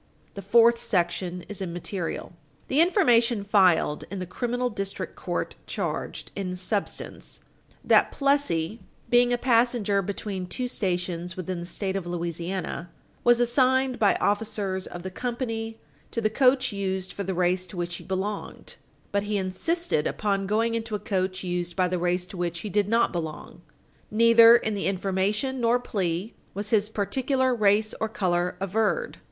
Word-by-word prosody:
The 200 - -7
fourth 230 +4 +5
section 180 -2 -1
is 205 -1 -4
immaterial. 175 0 -4 0.4
The 280 +4 +4
information 240 - +4
filed 185 -7 +3
in 200 - -5
the 185 - -3
criminal 245 +6 -2
District 195 -2 -4
Court - - -3
charged - - -4
in 185 -2 -3
substance 195 +3 -4 0.4
that - - +4
Plessy, 260 - 0 0.3
being 245 0 +5
a 245 - +2
passenger 235 -5 +2
between 195 -1 -4
two 250 +7 -3
stations 180 -4 -2
within 185 0 -4
the 170 - -6
State 190 +1 -3
of 190 -3 -3
Louisiana, 175 +1 -4 0.3
was 240 0 +5
assigned 255 +1 +2
by 205 - +4
officers 205 -3 -1
of 175 0 -8
the 185 - -5
company 225 -1 -3 0.3
to - - -3
the 215 -1 +1
coach 255 +1 +3
used 190 -1 -3
for - - -5
the 190 -1 -3
race 180 +1 +1
to 180 - -10
which 175 0 -3
he - - -11
belonged, 195 +2 -4 0.3
but 200 - +1
he 210 - +1
insisted 195 - 0
upon 195 -2 -1
going 225 +3 +1
into 225 -1 -2
a - - -3
coach 190 -3 -2
used 175 -1 -2
by 185 -1 +2
the 180 0 -1
race 180 +1 0
to 185 - -10
which 170 -1 -2
he 210 - -5
did 205 0 +2
not 230 -2 +2
belong. 160 0 -6 0.5
Neither 230 +1 +7
in 220 -2 +1
the 200 - -1
information 200 +7 0
nor 235 +1 +4
plea 190 -3 -2 0.2
was 205 +1 -2
his 210 -2 +3
particular 260 +5 0
race 215 -1 +3
or 220 - 0
color 180 -4 0
averred. 220 - -1
200 Hz, 160 wpm, -26 LUFS, 180-230 Hz, 0.5 s, Neither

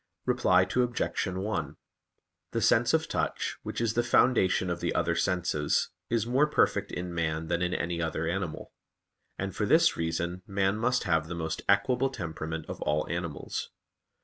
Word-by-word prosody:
Reply 90 0 +4
Obj. 120 +1 0
1: 95 -6 -3 0.8
The - - 0
sense - - +4
of - - 0
touch, - - -2
which - - -5
is 115 -2 +1
the 120 - +2
foundation 120 -7 +3
of 85 - -2
the - - -2
other 85 - +1
senses, 85 -5 0 0.2
is 115 -2 +1
more 130 +5 +3
perfect 150 - +1
in 90 0 -4
man 80 -1 -2
than 85 0 0
in 90 0 0
any 85 0 -2
other 80 0 -2
animal; 90 -1 -3 0.7
and 95 -1 -4
for 105 - 0
this 165 +6 +5
reason 85 +2 -2
man 95 +1 +1
must 125 +3 +1
have 80 -4 +1
the 90 - -5
most 80 -1 -3
equable 125 +7 +3
temperament 80 -7 -5
of - - -7
all 75 +1 0
animals. 85 -3 -4
90 Hz, 165 wpm, -29 LUFS, 80-110 Hz, 0.8 s, this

